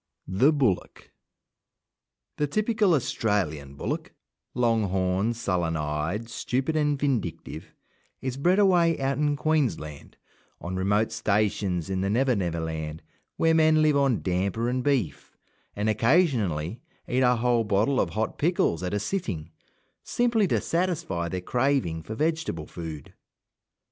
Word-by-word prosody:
THE 110 - +4
BULLOCK 130 - -1 1.3
The 150 - +1
typical 210 +2 +2
Australian 90 - -1
bullock - - -4 0.4
long 115 -3 +2
horned, 95 +4 0
sullen 90 -7 -1
eyed, 75 +9 -2
stupid, 130 +6 -2
and 150 -2 +1
vindictive 110 - -3 0.4
is 130 -1 -3
bred 175 +7 +2
away 175 -5 +4
out 135 0 -1
in 145 -1 +2
Queensland, 125 - -2 0.4
on 90 +2 -5
remote 100 +4 +1
stations 100 -5 0
in 95 -1 -1
the 95 - 0
Never 125 +4 +2
Never 85 -4 -1
land, 80 -1 -5 0.3
where 165 0 +3
men 155 -1 +4
live 150 -1 +4
on 135 -5 +2
damper 100 +6 0
and 125 0 -1
beef, 125 - -1 0.4
and 105 +1 -1
occasionally 110 - +1 0.3
eat 130 +1 +1
a 125 -1 +4
whole 120 0 +2
bottle 105 +6 +1
of 85 - -1
hot 110 +6 -3
pickles 150 - +1
at 90 +2 -2
a - - 0
sitting, 100 - -3 0.5
simply 235 -4 +1
to - - +1
satisfy 165 - -1
their 90 +1 -3
craving 125 -7 0
for 110 +8 -7
vegetable 155 - -1
food. 80 -4 -8
115 Hz, 135 wpm, -26 LUFS, 90-145 Hz, 1.3 s, THE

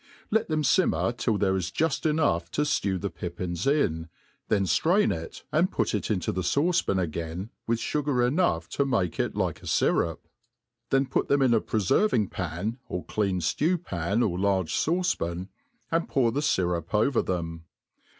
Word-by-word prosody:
Let 220 +1 +2
them 155 -1 0
fimmer 185 -7 +2
till 115 -2 0
there 95 -1 +1
is 90 -2 -1
juft 160 - 0
enough 115 - +1
to 150 - +1
ftew 100 -10 0
the 100 +1 -3
pippins 85 +2 -4
in, 80 - +1 0.4
then 100 -2 +2
ftrain 180 - +3
it, 80 0 -8
and 175 +5 +2
put - - 0
it 105 - -2
into 95 -6 0
the 95 - -2
fauce 145 - +2
pan 95 - 0
again, 85 +3 -3 0.2
with 115 0 +2
(tigar 135 -1 0
enough 125 - +1
to 140 - 0
malce 115 - -1
it - - -1
like - - -1
a - - -10
fyrup; 80 -1 +2 0.7
then 135 0 +3
put 130 - -1
them 140 -1 +3
in 125 -3 +4
a 115 - +3
preferving? 110 - +1
pan, 95 +7 -3
or 90 - -4
clean 95 -4 -1
ftew 165 - +1
pan, 95 +7 0
or 90 -5 -1
large 95 -4 +1
fauce 180 +3 +1
pan, 85 +3 -4 0.4
and 165 +1 0
pour 125 -4 +2
the 135 - -1
fyrup 90 - 0
over 115 +4 +3
them. 80 -2 -4
105 Hz, 180 wpm, -27 LUFS, 90-145 Hz, 0.7 s, in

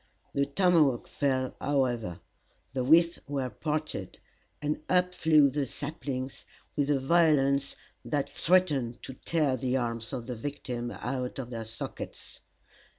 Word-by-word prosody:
The 140 0 +1
tomahawk 155 -5 +3
fell, 130 -2 0
however, 120 - 0 0.5
the 130 -2 0
withes 170 +5 +5
were 135 -3 -2
parted, 155 +6 -3 0.4
and 150 +1 -2
up 180 0 +3
flew 155 -4 +5
the 140 0 -1
saplings, 135 -2 -5 0.3
with 145 -1 +1
a 145 - +4
violence 140 -2 +3 0.3
that 145 -2 -1
threatened 150 -10 +1
to 130 - -6
tear 150 0 0
the 130 0 0
arms 115 -2 -2
of 125 -4 -4
the 125 - -4
victim 120 -1 -4
out 125 +1 -4
of 125 -2 -5
their 115 -2 -4
sockets. 110 +1 -6
140 Hz, 135 wpm, -29 LUFS, 125-150 Hz, 0.5 s, withes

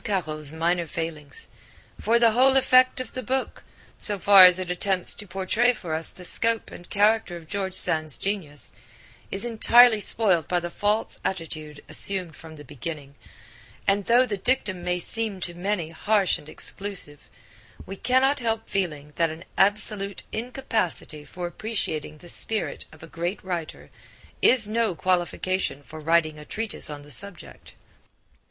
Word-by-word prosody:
Caro's 155 -8 -3
minor 170 +1 0
failings, 165 - -4 0.5
for 230 +2 +2
the 235 -1 +5
whole 265 +4 +5
effect 255 0 +4
of 255 - -6
the 255 - -4
book, 260 +2 -3 0.4
so 205 - +1
far 195 -1 +9
as 180 -1 +6
it 185 -1 -3
attempts 185 0 0
to 205 - -8
portray 195 +7 +1
for 175 -8 -6
us 160 +1 +2
the 185 - -5
scope 230 +5 +1
and 175 - -12
character 210 -2 +2
of 165 - -12
George 190 0 -2
Sand's 155 -5 +2
genius, 160 - -4 0.6
is 195 +4 -2
entirely 235 0 +6
spoiled 190 -7 +1
by 180 - +1
the 175 0 -6
false 210 +4 -1
attitude 155 -4 -5
assumed 185 -5 -1
from 160 -1 -12
the 150 - -11
beginning, 145 +1 -7 0.7
and 195 0 +1
though 245 +2 +5
the 210 -5 -3
dictum 190 -6 0
may 180 0 0
seem 215 +2 -3
to 175 - -3
many 175 -2 -2
harsh 200 +3 +1
and 150 - -13
exclusive, 195 -8 -3 0.6
we 195 - -7
cannot 265 +6 +2
help 225 -2 -2
feeling 150 -7 -3
that 165 -1 +2
an 160 +2 -9
absolute 200 0 0
incapacity 220 - -3
for 175 +4 -7
appreciating 175 -6 -4
the 175 - -15
spirit 220 +5 -4
of 155 0 -16
a - - -9
great 170 +4 -4
writer 170 -4 -5 0.5
is 240 -4 +6
no 220 -3 0
qualification 185 -3 -1
for 155 +2 -10
writing 155 -1 +1
a - - -9
treatise 220 +4 -1
on 145 -1 -7
the 145 - -12
subject. 190 +4 -3
185 Hz, 160 wpm, -25 LUFS, 165-220 Hz, 0.7 s, far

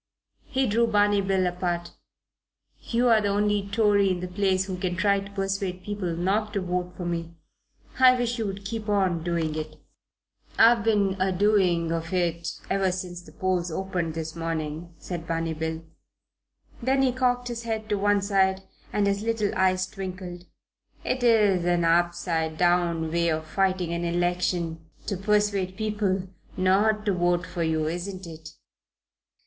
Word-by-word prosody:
He 265 0 0
drew 230 +1 +2
Barney 205 -2 +3
Bill 190 -1 +1
apart. 175 -1 -2 0.9
"You're 235 -2 +3
the 205 - 0
only 205 0 +1
Tory 205 -2 +3
in 185 -1 0
the 180 - -4
place 190 0 +1
who 190 -1 -4
can 180 -1 -1
try 200 +2 +2
to 195 0 -9
persuade 195 -2 -2
people 200 -5 -3
not 205 +5 0
to 200 - 0
vote 180 0 -2
for 180 - -5
me. 170 -1 -3 0.6
I 255 -1 +7
wish 240 -1 -1
you 220 - -1
would 195 0 -6
keep 220 +1 -4
on 190 -5 +1
doing 165 -2 -1
it." 155 0 -5 0.8
"I've 230 -1 +6
been 200 -3 +2
a 190 0 +2
doing 180 -4 +2
of 165 -1 -3
it 170 -2 0 0.2
ever 195 -1 +1
since 180 -1 -5
the 155 - -15
polls 180 +1 -1
opened 175 -2 -2
this 160 0 -5
morning," 165 0 -4
said 170 -1 -6
Barney 165 0 -1
Bill. 160 +1 -4 1.0
Then 265 +2 +2
he 260 - +3
cocked 245 -1 0
his 235 -1 -4
head 220 -2 -3
on 200 - -1
one 205 0 +3
side 190 -1 +2 0.3
and 205 - +1
his 200 0 +1
little 225 -2 0
eyes 185 0 +2
twinkled: 185 -2 -7 0.6
"It's 255 -1 -1 0.4
an 175 -1 +2
upside 165 -1 +1
down 175 -2 +2
way 170 0 +1
of 155 0 -1
fighting 185 0 0
an 170 0 -2
election 175 -1 -1 0.2
to 200 - -2
persuade 200 -1 0
people 205 -3 -1 0.3
not 205 +3 +2
to 205 - +2
vote 175 0 +1
for 175 - -5
you, 160 -1 +1
isn't 180 +4 -4
it?" 160 -1 -10
185 Hz, 160 wpm, -26 LUFS, 170-205 Hz, 1.0 s, I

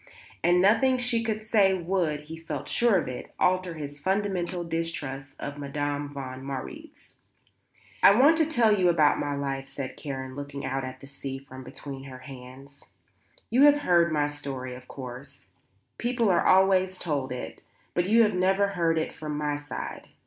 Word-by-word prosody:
And 175 +1 +4
nothing 230 +7 +4
she 245 -2 +1
could 215 -1 -2
say 205 -3 +4
would, 170 -4 -1
he 155 +2 -9
felt 165 0 -6
sure 235 -4 +3
of 165 - -1
it, 125 -1 -7
alter 185 -2 +1
his 145 -2 -7
fundamental 185 -1 -1
distrust 145 -5 -4
of 145 0 -6
Madame 145 0 -3
von 130 -2 -7
Marwitz. 140 - -8 0.9
"I 200 - +8
want 295 +5 +7
to 320 -2 +3
tell 235 -8 +4
you 185 -3 +3
about 155 -4 +4
my 145 -1 -1
life," 135 -1 -3
said 135 -2 -6
Karen, 130 -3 -6
looking 140 0 -6
out 135 0 -2
at 130 0 -7
the - - -10
sea 140 -1 -6
from 130 -1 -11
between 135 +1 -8
her 130 -2 -9
hands. 135 +2 -12 0.7
"You 260 +4 +6
have 290 0 +6
heard 170 - +3
my 150 -1 +2
story, 135 -3 -5
of 125 0 -11
course; 130 -3 -9 0.5
people 235 -3 +1
are 175 - +2
always 190 0 +4
told 140 -7 -2
it; 125 0 -6 0.3
but 180 +2 0
you 230 +2 +6
have 210 -1 +2
never 190 +2 +2
heard 170 -4 +1
it 160 - -1
from 150 -1 -5
my 150 -1 -1
side. 145 0 -7
155 Hz, 175 wpm, -27 LUFS, 140-190 Hz, 0.9 s, I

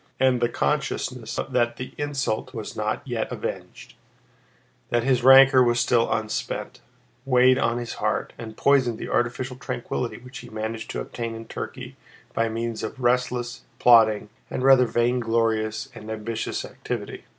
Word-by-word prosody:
And 130 -2 +3
the 120 - +2
consciousness 125 -4 -2
that 120 -2 +1
the 130 - -7
insult 135 -4 -2
was 110 -2 -6
not 110 +5 -2
yet 120 -3 -2
avenged, - - -6 1.0
that 120 -1 +1
his 130 -1 +2
rancor 135 0 +8
was 120 -1 +2
still 120 -1 +2
unspent, 110 -1 -3 0.4
weighed 130 -1 +4
on 115 -1 +1
his 120 -1 -4
heart - - -1
and 110 -2 -9
poisoned 130 -5 +3
the - - -6
artificial 125 +1 -1
tranquillity 125 -1 -4
which 125 +1 -10
he 120 - -11
managed 110 0 -5
to - - -3
obtain 115 -1 -5
in 115 0 -8
Turkey - - -7 0.4
by 115 0 +1
means 115 0 -3
of 110 +4 -5
restless, 125 0 0 0.2
plodding, 110 -3 +5 0.2
and 125 - -3
rather 130 -2 +6
vainglorious 115 -1 0
and 110 -2 -10
ambitious 110 +1 -3
activity. - - -6
120 Hz, 150 wpm, -24 LUFS, 115-125 Hz, 1.0 s, rancor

